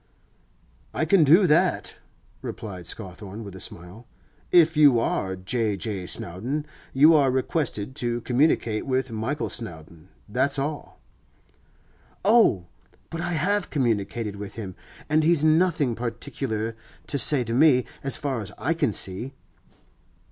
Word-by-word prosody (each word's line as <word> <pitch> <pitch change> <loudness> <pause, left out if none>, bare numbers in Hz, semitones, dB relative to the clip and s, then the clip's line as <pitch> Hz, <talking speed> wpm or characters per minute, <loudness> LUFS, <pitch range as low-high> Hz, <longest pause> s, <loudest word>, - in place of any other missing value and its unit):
'I - - 0
can 195 -5 +4
do 165 +7 +6
that,' 175 +3 +2 0.5
replied 90 -6 -7
Scawthorne 100 +1 -6
with 100 -2 -10
a - - -9
smile. 90 +7 -7 0.4
'If 165 -2 +5
you 145 -5 +6
are 95 -4 -1
J. 105 +2 -1
J. 95 -2 -4
Snowdon, 120 - -3 0.3
you 150 +5 +6
are 140 -4 +4
requested 130 -3 -1
to 120 0 -2
communicate 120 -3 +1
with 130 -1 -1
Michael 115 +7 -3
Snowdon—that's 85 - -4
all.' 145 +2 -5 1.3
'Oh! 210 - +4 0.5
but 165 - -4
I 175 - -2
have 200 +6 0
communicated 115 -5 -2
with 100 -1 -8
him, 100 -5 -6 0.3
and 155 +1 +2
he's 165 -1 +3
nothing 155 -5 +2
particular 115 -1 -4 0.3
to 140 - -2
say 135 -1 +6
to 115 0 -4
me, 130 -1 +4 0.2
as 135 - +1
far 135 -5 -3
as 105 -1 -7
I 160 - 0
can 145 -9 0
see. 100 +10 -1
125 Hz, 135 wpm, -24 LUFS, 105-150 Hz, 1.3 s, do